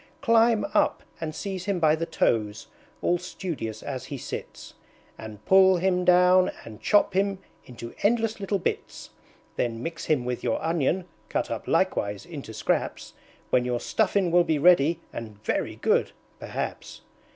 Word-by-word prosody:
Climb 230 -2 +4
up, - - +2 0.2
and 155 -1 -4
seize 190 -1 -5
him 200 -3 -1
by 155 -2 +4
the 165 +1 -3
toes, 105 -2 0 0.4
all 175 - +2
studious 165 - -5
as 130 -1 -5
he 140 - -6
sits, - - -8 0.4
And 110 -2 -10
pull 190 -1 +6
him 180 0 +1
down, 180 +1 +5 0.2
and 110 -1 -11
chop 205 -1 +3
him 195 +1 +1 0.3
into 115 -1 -9
endless 225 0 +1
little 200 0 -1
bits! 185 - -4 0.5
Then 115 -1 -2
mix 165 -1 -5
him 140 -6 +1
with 125 0 -3
your - - 0
Onion 165 +2 0 0.2
(cut - - -2
up - - -5
likewise 100 -1 0
into 145 -9 -8
Scraps), - - -2 0.4
When 125 - +3
your 125 -1 -1
Stuffin' 195 - +1
will 175 0 +5
be 160 -2 0
ready, 165 0 +4
and 110 -3 -7
very - - -1
good - - +1 0.3
perhaps." - - -5
170 Hz, 155 wpm, -26 LUFS, 125-190 Hz, 0.5 s, pull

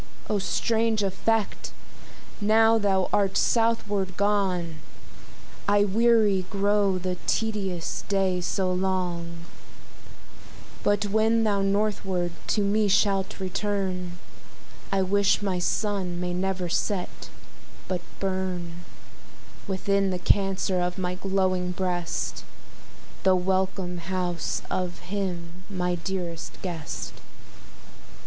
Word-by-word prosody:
O 210 - +2
strange 225 +2 +1
effect! 205 +2 0 0.7
now 225 +2 +5
thou 195 -3 +2
art 195 -1 +2
southward 210 -5 +1
gone, 190 -5 +1 0.9
I 205 0 +5
weary 210 -2 +3
grow 200 -1 +2
the 180 0 -2
tedious 195 -6 -1
day 190 -2 +2
so 185 +1 0
long; 175 -3 -2 1.4
But 205 0 +2
when 220 +2 +3
thou 205 -2 +2
northward 195 -3 0 0.2
to 210 - +2
me 210 +1 +2
shalt 195 -1 +2
return, 185 -2 -2 0.7
I 195 -1 +2
wish 200 +2 +2
my 190 -3 0
Sun 185 -2 -1
may 180 0 -2
never 185 0 -1
set, 185 +2 -2 0.6
but 180 -2 -2 0.2
burn 185 -3 -2 0.9
Within 195 0 +1
the 185 - -1
Cancer 195 0 +2
of 180 0 -1
my 180 -1 -1
glowing 185 -1 0
breast, 175 -2 -2 0.8
The 190 -1 +5
welcome 185 -1 0
house 175 -1 -2
of 180 -1 -1 0.2
him 180 -3 -3
my 180 -2 -1
dearest 175 -2 -4
guest. 145 - -4
190 Hz, 100 wpm, -26 LUFS, 180-205 Hz, 1.4 s, now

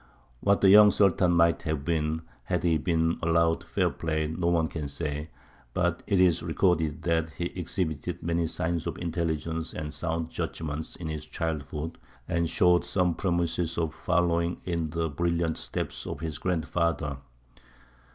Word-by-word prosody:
What 100 +6 +2
the 95 - +6
young 105 +1 +9
Sultan 95 -3 +3
might 85 0 +4
have 80 -3 -2
been, 80 -1 0 0.2
had - - -1
he 80 -2 +3
been 80 +1 +1
allowed 85 0 +2
fair - - 0
play, 80 -1 -1
no 80 +3 -2
one 85 -2 +3
can 75 -2 -4
say; 75 +1 -4 0.5
but - - +1
it 100 - +2
is 90 -3 +4
recorded 80 -4 +1
that 80 -1 +1
he 85 +4 -4
exhibited 90 -1 -3
many 85 0 0
signs 85 0 -2
of - - -3
intelligence 80 -1 -2
and 75 -1 -4
sound 80 0 -2
judgment 75 0 -4
in 85 - -5
his 75 -1 -5
childhood, 75 0 -4 0.3
and 85 -1 0
showed 90 +1 +4
some 90 0 +1
promise 85 -2 -1
of 80 -2 0
following 85 0 +1
in 85 -3 -2
the 85 +1 -1
brilliant 85 +2 0
steps - - -4
of - - -4
his 80 -2 -4
grandfather. 85 -4 -1
85 Hz, 155 wpm, -28 LUFS, 80-85 Hz, 0.5 s, young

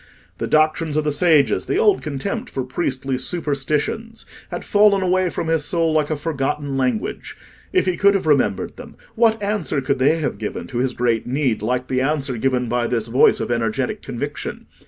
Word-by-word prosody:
The - - -2
doctrines 155 0 +2
of 155 - +2
the 150 - 0
sages, 155 -2 +3
the - - 0
old 420 -2 +3
contempt 155 - -4
for 135 - -3
priestly 130 -1 -2
superstitions, 155 - -2 0.2
had - - -6
fallen 205 -2 +4
away 185 0 +2
from 165 - -4
his 160 -2 +1
soul 165 +1 +1
like 155 -1 +1
a 155 - 0
forgotten 145 -2 -2
language: 125 -4 -2 0.3
if - - +2
he 185 -2 0
could 200 0 +4
have 195 - -1
remembered 135 -10 +1
them, - - -11 0.2
what 225 -1 +3
answer 200 -7 -1
could 135 0 -1
they 140 +5 +4
have 150 -10 -3
given 105 - -4
to 120 - -4
his 125 0 -1
great 120 -2 0
need 130 -4 0
like 125 +3 -1
the 130 0 0
answer 135 -2 0
given 125 0 0
by 120 0 0
this 115 -2 -1
voice 125 +4 +4
of - - -3
energetic 115 -2 -1
conviction? - - -5
145 Hz, 190 wpm, -21 LUFS, 130-170 Hz, 0.3 s, fallen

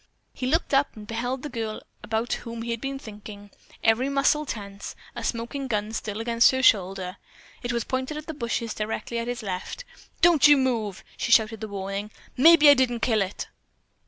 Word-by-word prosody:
He 255 - -4
looked 320 +2 0
up 275 +1 +2
and 215 -1 -10
beheld 245 +4 -3
the 295 - -4
girl 225 -3 -4 0.2
about 225 +2 -2
whom 230 -1 -6
he 235 - -3
had 230 -1 -3
been 275 0 -3
thinking, 205 -4 -11 0.3
every 235 +4 +3
muscle 280 +2 +2
tense, 200 -3 -6 0.2
a 240 - -5
smoking 240 +4 -3
gun 210 -3 -1
still 215 -1 -4
against 230 +2 +4
her 260 -1 0
shoulder. 190 -3 +2 0.4
It 240 - -3
was 235 -1 -1
pointed 260 +3 -3
at 305 - -7
the 320 - -5
bushes 235 -4 -3
directly 220 +2 -3
at 230 - -4
his 245 -1 -4
left. 190 - -5 0.4
"Don't 330 -4 +6
you 290 -1 +7
move!" 230 -7 -1
she - - -2
shouted 220 -1 +4
the 220 - -4
warning. 200 +1 -4 0.3
"Maybe 310 +2 +7
I 290 - +10
didn't 250 -3 +1
kill 220 -4 +2
it." 195 0 -3
235 Hz, 190 wpm, -25 LUFS, 215-265 Hz, 0.4 s, I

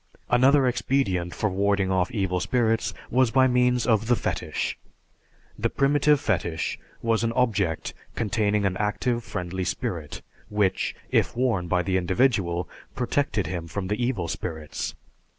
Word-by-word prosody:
Another 130 +3 +5
expedient 115 -8 0
for 105 - 0
warding 100 0 +1
off 95 -1 +1
evil 95 -6 -1
spirits 115 +1 +1 0.2
was 130 0 +4
by 130 +2 +4
means 125 -1 +3
of 110 -2 +2
the 120 - +4
fetish. - - -2 0.8
The - - +1
primitive 145 +1 +3
fetish 85 - -1 0.2
was 115 -1 +2
an 115 - +1
object 105 -10 0 0.2
containing 105 -1 +1
an 95 -1 0
active 120 +3 0
friendly 90 -1 -4
spirit, 80 -3 -4 0.3
which, 105 -3 0 0.2
if - - +1
worn 115 -9 +1
by 90 +1 +1
the 95 0 +1
individual, 90 -2 +1 0.3
protected 125 -4 0
him 85 -3 -4
from 95 +2 -4
the 105 +4 -1
evil 115 -9 -1
spirits. 80 -1 -4
105 Hz, 140 wpm, -25 LUFS, 90-125 Hz, 0.8 s, Another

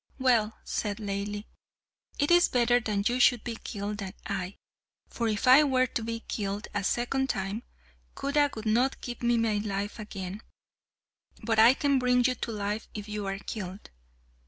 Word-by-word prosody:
"Well," 235 -5 +2
said 205 -2 -2
Laili, 205 0 -4 0.7
"it 290 +3 +1
is 350 0 +6
better 245 0 +3
that 210 -3 -1
you 245 +1 0
should 245 -2 +4
be 235 - -4
killed 205 -1 -5
than 195 -1 -6
I, 190 -1 -3 0.5
for 235 - -2
if 215 +2 -1
I 265 +4 +9
were 260 -3 +3
to 235 - -3
be 230 0 -4
killed 205 -1 -4
a 205 -1 -1
second 265 +6 0
time, 195 +2 -2 0.5
Khuda 290 +1 +2
would 220 0 -7
not 240 +5 +2
give 240 -1 -6
me 240 0 +2
my 225 -2 +1
life 205 +1 -3
again; 200 -1 -6 1.0
but 225 0 +1
I 235 +4 +8
can 280 -2 +2
bring 250 0 +3
you 255 - +3
to 240 -1 -5
life 210 +1 -3
if 210 0 -6
you 210 -1 -4
are 195 0 -2
killed." 195 -1 -7
220 Hz, 175 wpm, -28 LUFS, 205-245 Hz, 1.0 s, I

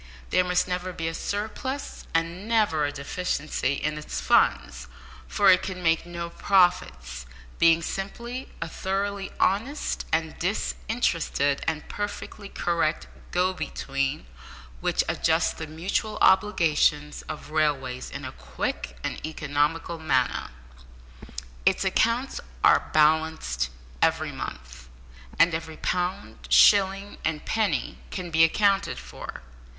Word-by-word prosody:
There 185 - +4
must 180 0 +1
never 180 0 -2
be 165 -1 -3
a 165 - -2
surplus, 220 +10 -4
and 165 +5 -1
never 210 -10 +2
a 145 - -1
deficiency, 145 -1 -2
in 150 +2 -2
its 150 - -5
funds, 65 -2 +2 0.4
for 60 - +5
it 185 - +5
can 180 -1 -5
make 165 0 +2
no 170 -1 -5
profits, 65 - +1 0.3
being 165 0 +5
simply 235 +8 -5
a - - -6
thoroughly 195 +3 -2
honest 230 +10 0
and 160 0 -1
disinterested 175 - 0
and 155 -2 -2
perfectly 205 0 -5
correct 170 -4 0 0.2
go 180 +1 +1
between, 140 -4 -2 0.5
which - - +1
adjusts - - +2
the 160 - -7
mutual 190 +7 -2
obligations 165 -6 +3
of 155 -1 -7
railways 140 -5 0
in - - -7
a - - -5
quick - - -4
and - - -4
economical 155 +2 -1
manner. 130 -6 0 1.1
Its 190 +1 +2
accounts 230 +7 +1 0.2
are - - +5
balanced 155 - +2 0.3
every - - +2
month, 65 0 -8 0.5
and 165 0 +5
every 160 -1 -4
pound, 180 +2 -3
shilling, 195 0 +5
and 155 -2 -2
penny 205 - 0
can 180 -2 -5
be 160 0 +5
accounted 200 +4 +3
for. - - -9
165 Hz, 120 wpm, -26 LUFS, 150-195 Hz, 1.1 s, for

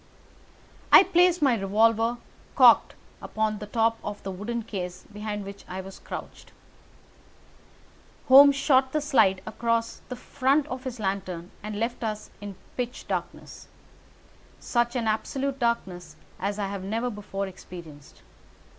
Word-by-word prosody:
I - - +10
placed 360 -2 +3
my 265 -4 +4
revolver, 225 +3 +2 0.4
cocked, - - +6 0.3
upon 215 -1 -2
the 210 - -7
top 225 +1 +1
of 205 0 -6
the 195 - -4
wooden 225 +5 -4
case 180 -4 -6
behind 210 -1 -5
which 200 0 -10
I 185 - -6
crouched. 190 0 -9 1.8
Holmes 280 +2 +9
shot 265 -1 +2
the 305 - +2
slide 195 -10 +3
across 230 +1 -2
the 250 - -4
front 275 +3 +1
of 255 +1 -6
his 250 -2 -5
lantern 190 -4 -3
and 210 0 -5
left 235 +2 -2
us 215 -1 -4
in 205 -1 -7 0.2
pitch 250 0 -4
darkness—such 240 0 -6
an 240 -2 -1
absolute 270 +5 -2
darkness 185 - -2 0.2
as 200 +2 -2
I 205 - -1
have 200 -1 -5
never 225 +5 -2
before 200 -2 -5
experienced. 170 -6 -12
220 Hz, 130 wpm, -26 LUFS, 195-250 Hz, 1.8 s, I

